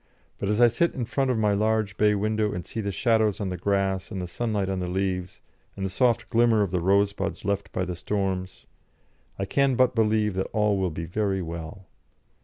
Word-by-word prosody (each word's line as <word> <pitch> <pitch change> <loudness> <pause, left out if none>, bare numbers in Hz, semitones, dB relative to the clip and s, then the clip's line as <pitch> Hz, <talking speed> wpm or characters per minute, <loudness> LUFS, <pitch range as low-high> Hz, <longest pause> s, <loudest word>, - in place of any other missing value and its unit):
But 100 - -2
as 105 +1 +1
I 120 - +8
sit 145 +9 +1
in 125 - -2
front 135 +3 0
of 125 - +1
my 105 -2 +2
large 110 0 +1
bay 105 0 +3
window 105 +1 0
and 90 - -5
see 110 - -4
the 100 - -2
shadows 110 -1 +1
on 100 -3 -2
the 90 - -3
grass 95 -1 0
and 100 - -5
the 90 - -3
sunlight 105 +1 -2
on 95 -1 -2
the 90 - -3
leaves, 90 0 -2 0.4
and 95 - -2
the 95 - -3
soft 120 0 +2
glimmer 115 -2 +4
of 95 - -3
the 90 -2 0
rosebuds 100 +2 +1
left 100 0 -1
by 95 - -1
the 90 0 -4
storms, 95 0 -3 0.7
I 95 - -2
can 135 +5 +2
but 130 +1 +3
believe 110 -2 +2
that 95 +1 -2
all 105 -2 +2
will 95 -1 +1
be 80 +1 -5
very 95 +1 -1
well. 85 +3 -7
100 Hz, 215 wpm, -26 LUFS, 95-110 Hz, 0.7 s, I